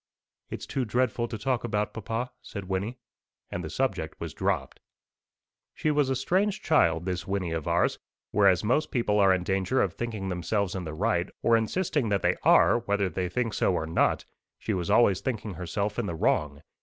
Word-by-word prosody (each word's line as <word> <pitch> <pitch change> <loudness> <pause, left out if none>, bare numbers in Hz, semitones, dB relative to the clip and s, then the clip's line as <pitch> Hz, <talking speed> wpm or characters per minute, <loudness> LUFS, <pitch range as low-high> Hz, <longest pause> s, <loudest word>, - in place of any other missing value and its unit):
"It's - - -6
too 135 - -2
dreadful 120 0 0
to 115 - -5
talk 125 +3 -1
about, 105 -3 -1
papa," 115 +3 -3
said 100 -3 -7
Wynnie; 100 +6 -2 0.5
and 90 - -4
the 80 - -5
subject 85 -7 -2
was - - -5
dropped. - - -2 1.0
She 155 - 0
was 145 -2 +2
a 130 - +1
strange 190 +10 +1
child, 85 - +3
this 90 -2 -3
Wynnie 95 -3 -1
of 80 -3 -4
ours. - - +1 0.3
Whereas 95 -4 +4
most 125 +8 +1
people 105 -4 +1
are 100 -1 +6
in 95 -1 +1
danger 95 +7 0
of - - +1
thinking 110 -5 -4
themselves 95 +2 -1
in 95 -2 -4
the 80 -1 -5
right, 95 -1 0
or 115 - +5
insisting 130 - 0
that 100 -2 0
they - - +3
are - - +5
whether 100 -4 0
they 90 +1 -2
think 115 +1 -1
so 90 - +1
or 80 - -1
not, 80 - +1 0.3
she 110 - -3
was 90 -3 -2
always 100 -6 +4
thinking 110 -5 -3
herself 100 +6 -3
in 115 - -1
the 85 - -3
wrong. 75 -2 0
105 Hz, 195 wpm, -27 LUFS, 90-120 Hz, 1.0 s, are